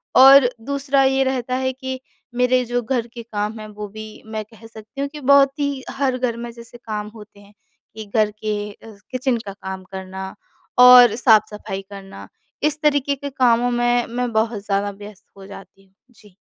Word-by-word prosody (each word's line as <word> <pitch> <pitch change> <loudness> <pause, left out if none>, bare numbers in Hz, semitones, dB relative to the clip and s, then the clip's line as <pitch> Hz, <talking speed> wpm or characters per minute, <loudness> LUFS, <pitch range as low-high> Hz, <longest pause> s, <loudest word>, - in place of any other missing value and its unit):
और 270 -1 +8 0.2
दूसरा 275 0 +1
ये 265 0 +2
रहता 255 -1 -2
है 260 0 -1
कि 260 0 -6 0.4
मेरे 250 +1 +2
जो 245 +1 -1
घर 240 0 -2
के 235 - -8
काम 215 -1 -4
हैं 215 - -8
वो 210 0 -8
भी 215 0 -7 0.2
मैं 220 0 -5
कह 225 +1 -17
सकती 225 +4 -10
हूँ 280 - -1
कि 300 +1 -10
बहुत 280 -1 +6
ही 280 -2 -2
हर 270 -2 -1
घर 245 -2 -2
में 240 - -6
जैसे 235 0 -13
काम 210 -1 -4
होते 210 -2 -14
हैं 205 0 -19 0.4
कि 220 -1 -7
घर 215 -1 +3
के 215 -1 -2 0.2
अ, 220 +1 -14 0.2
किचन 255 -1 0
का 200 - -6
काम 190 -1 -8
करना, 190 0 -7 0.4
और 250 -2 +9
साफ-सफाई 215 -4 +1
करना, 195 -1 -11 0.4
इस 300 0 +1
तरीके 285 -2 +1
के 280 +1 -6
कामों 245 -2 +2
में 240 0 +1
मैं 245 +1 -2
बहुत 220 -1 -1
ज़्यादा 200 0 0
व्यस्त 210 0 -12
हो 195 - -12
जाती 195 -1 -13
हूँ। 190 - -33 0.2
जी। 210 -5 -21
235 Hz, 190 wpm, -21 LUFS, 210-260 Hz, 0.4 s, और